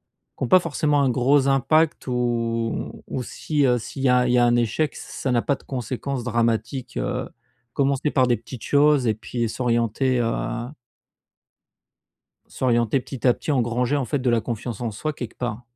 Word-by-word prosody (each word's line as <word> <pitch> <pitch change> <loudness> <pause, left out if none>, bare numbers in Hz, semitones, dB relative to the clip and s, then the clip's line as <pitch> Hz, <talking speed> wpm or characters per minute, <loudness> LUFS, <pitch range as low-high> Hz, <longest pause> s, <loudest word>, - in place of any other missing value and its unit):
qui - - -10
ont - - 0
pas 185 - +7
forcément 150 -3 +1
un 135 - +3
gros 135 +3 +3
impact, 155 +4 +2
ou 115 -2 -2
ou 130 - -4
si, 150 +4 -2
heu, 125 - +3
s'il 120 +4 -7
y 130 - +3
a 125 0 +4
il 125 - +2
y 125 - +5
a 120 - +5
un 120 0 +3
échec, 120 +6 0
ç - - -8
ça 130 - -4
n'a 120 -1 +2
pas 140 - +1
de - - -7
conséquences 130 0 -4
dramatiques, 120 +2 -1
heu, - - -2 0.4
commencer 140 +1 +1
par 130 -3 +3
des 120 -2 +2
petites 115 +1 -10
choses 145 -2 +4
et 110 - +3
puis 115 +2 -3
s'orienter 120 +1 0
heu 120 +1 -2 1.8
s'orienter 120 0 +1
petit 130 0 -5
à 125 - +6
petit, - - -5
engranger, 125 +1 +1
en 135 - 0
fait, 145 +3 -1
de 125 -1 +1
la 115 - +2
confiance 120 -1 -5
en 120 - -2
soi, 155 +9 -3
quelque 120 -5 -7
part. 120 -1 -4
125 Hz, 190 wpm, -23 LUFS, 120-135 Hz, 1.8 s, pas